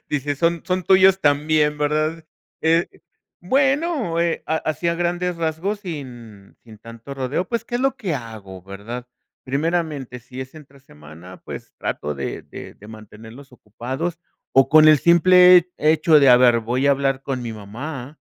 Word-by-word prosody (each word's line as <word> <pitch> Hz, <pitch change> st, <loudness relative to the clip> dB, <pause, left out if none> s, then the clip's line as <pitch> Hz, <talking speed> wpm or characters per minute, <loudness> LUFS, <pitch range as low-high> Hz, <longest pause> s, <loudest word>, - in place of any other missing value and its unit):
Dice: 145 Hz, 0 st, -2 dB
"Son 165 Hz, +2 st, 0 dB
son 185 Hz, 0 st, -1 dB
tuyos 190 Hz, 0 st, +5 dB
también", 150 Hz, +1 st, +1 dB
¿verdad?, 155 Hz, +2 st, -1 dB, 0.4 s
eh, 165 Hz, +2 st, +2 dB, 0.5 s
bueno, 270 Hz, -, 0 dB
eh, 170 Hz, -1 st, -1 dB
a 160 Hz, -, 0 dB
así 155 Hz, +2 st, -3 dB
a 170 Hz, -, 0 dB
grandes 175 Hz, +1 st, -2 dB
rasgos, 170 Hz, +6 st, -3 dB
sin 120 Hz, -, -10 dB
sin 110 Hz, -3 st, -15 dB
tanto 115 Hz, +4 st, -11 dB
rodeo, 135 Hz, +7 st, -3 dB
pues, 235 Hz, -1 st, -3 dB
¿qué 240 Hz, -, -8 dB
es -, -, -4 dB
lo 270 Hz, 0 st, 0 dB
que 195 Hz, -11 st, -3 dB
hago, 110 Hz, -7 st, -9 dB
verdad? 105 Hz, +6 st, -8 dB, 0.4 s
Primeramente, 145 Hz, -3 st, -3 dB
si 130 Hz, +2 st, -10 dB
es 130 Hz, +2 st, -9 dB
entre 140 Hz, -3 st, -16 dB
semana, 80 Hz, -, -15 dB
pues -, -, -9 dB
trato 75 Hz, 0 st, -4 dB
de 70 Hz, -1 st, -5 dB
de -, -, -11 dB
de 105 Hz, -, -16 dB
mantenerlos 110 Hz, +5 st, -13 dB
ocupados 130 Hz, -, -6 dB, 0.4 s
o 135 Hz, 0 st, +5 dB
con 155 Hz, +1 st, +6 dB
el 155 Hz, -2 st, +6 dB
simple 180 Hz, +1 st, +6 dB
he 155 Hz, +1 st, +3 dB
hecho 155 Hz, -1 st, +4 dB
de: 140 Hz, -, +5 dB
"A 125 Hz, -, +8 dB
ver, 120 Hz, -2 st, +4 dB
voy 125 Hz, +5 st, -1 dB
a 140 Hz, -, +5 dB
hablar 135 Hz, -1 st, -1 dB
con 130 Hz, -3 st, -4 dB
mi 115 Hz, -1 st, -5 dB
mamá". 125 Hz, +7 st, -8 dB
145 Hz, 170 wpm, -21 LUFS, 120-170 Hz, 0.5 s, A